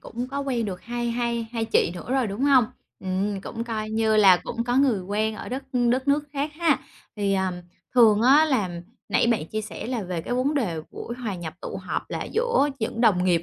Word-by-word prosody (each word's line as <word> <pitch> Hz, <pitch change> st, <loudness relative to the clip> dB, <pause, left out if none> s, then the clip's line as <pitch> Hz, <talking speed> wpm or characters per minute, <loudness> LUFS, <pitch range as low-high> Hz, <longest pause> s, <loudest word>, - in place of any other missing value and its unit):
cũng 245 Hz, +3 st, -6 dB
có 280 Hz, +1 st, -3 dB
quen 250 Hz, -5 st, -1 dB
được 185 Hz, -3 st, -5 dB
hai 240 Hz, 0 st, -3 dB
hai 235 Hz, -1 st, -1 dB
hai 230 Hz, -1 st, -1 dB
chị 220 Hz, -6 st, +2 dB
nữa 180 Hz, +7 st, -8 dB
rồi, 260 Hz, -4 st, +2 dB
đúng 200 Hz, +3 st, -5 dB
hông? 265 Hz, -4 st, +6 dB, 0.4 s
Ừm, 195 Hz, +2 st, -2 dB
cũng 230 Hz, +4 st, -5 dB
coi 215 Hz, -2 st, -4 dB
như 220 Hz, 0 st, +2 dB
là 195 Hz, -3 st, +7 dB
cũng 235 Hz, +6 st, -4 dB
có 245 Hz, +1 st, 0 dB
người 260 Hz, -8 st, +3 dB
quen 215 Hz, +3 st, -1 dB
ở -, -, -7 dB
đất 260 Hz, +3 st, -4 dB, 0.3 s
đất 260 Hz, +3 st, 0 dB
nước 290 Hz, +1 st, +3 dB
khác 285 Hz, +2 st, -2 dB
ha. 325 Hz, -4 st, +2 dB, 0.4 s
Thì, 200 Hz, -1 st, +1 dB
ờm, 190 Hz, -1 st, 0 dB, 0.4 s
thường 225 Hz, -3 st, +6 dB
á 285 Hz, +5 st, +6 dB
là 200 Hz, -, -1 dB, 0.3 s
nãy -, -, +3 dB
bạn 225 Hz, -9 st, +1 dB
chia 215 Hz, +5 st, -3 dB
sẻ 215 Hz, -, -7 dB
là 240 Hz, -3 st, -2 dB
về 180 Hz, -3 st, -3 dB
cái 245 Hz, -, -3 dB
vấn 265 Hz, +4 st, +1 dB
đề 180 Hz, -, -1 dB
buổi 235 Hz, -, -6 dB
hòa 230 Hz, -5 st, -4 dB
nhập 170 Hz, -3 st, -6 dB
tụ -, -, -5 dB
họp -, -, -3 dB
là -, -, -3 dB
giữa 470 Hz, -, +2 dB
những 225 Hz, +1 st, -3 dB
đồng 195 Hz, -6 st, +4 dB
nghiệp 175 Hz, -2 st, +3 dB
230 Hz, 230 wpm, -25 LUFS, 200-255 Hz, 0.4 s, là